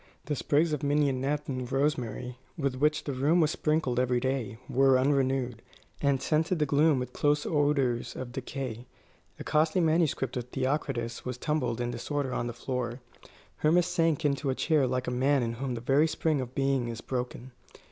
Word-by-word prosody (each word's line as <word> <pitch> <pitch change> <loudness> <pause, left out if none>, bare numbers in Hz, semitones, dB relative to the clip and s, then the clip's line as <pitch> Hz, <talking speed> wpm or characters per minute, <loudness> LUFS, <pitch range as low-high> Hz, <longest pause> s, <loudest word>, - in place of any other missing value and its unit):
The 150 - -1
sprigs 150 +4 +1
of 150 - -2
mignonette 145 0 0
and 130 -2 -4
rosemary, 125 -3 -1 0.2
with 140 -4 0
which 150 +3 +2
the 140 - -3
room 145 +7 +2
was 155 -2 +3
sprinkled 150 -7 0
every 125 -1 +2
day, 130 -3 -2
were 135 0 +4
unrenewed, 130 -3 +1 0.4
and 140 -2 +2
scented 160 +6 +1
the 150 - +2
gloom 150 +1 +3
with 125 -1 -4
close 145 0 +1
odours 145 -5 +1
of 130 -1 -6
decay. 130 -2 -5 0.5
A - - -5
costly 155 +3 +2
manuscript 160 -6 +1
of 120 - -3
Theocritus 130 -3 -2
was 125 -1 -4
tumbled 125 -5 -1
in 120 0 -1
disorder 135 +2 -3
on 120 - -1
the 120 - -4
floor. 125 0 -3 0.6
Hermas 170 +3 +3
sank 165 -3 +1
into 140 -1 +1
a 130 - 0
chair 150 -4 +2
like 130 0 -1
a - - -2
man 130 +2 +2
in 115 0 -2
whom 130 -3 -2
the 115 - -5
very 140 +6 +3
spring 155 -3 0
of 125 0 -7
being 135 -3 +1
is 115 -1 -5
broken. 125 0 -4
135 Hz, 180 wpm, -29 LUFS, 125-150 Hz, 0.6 s, were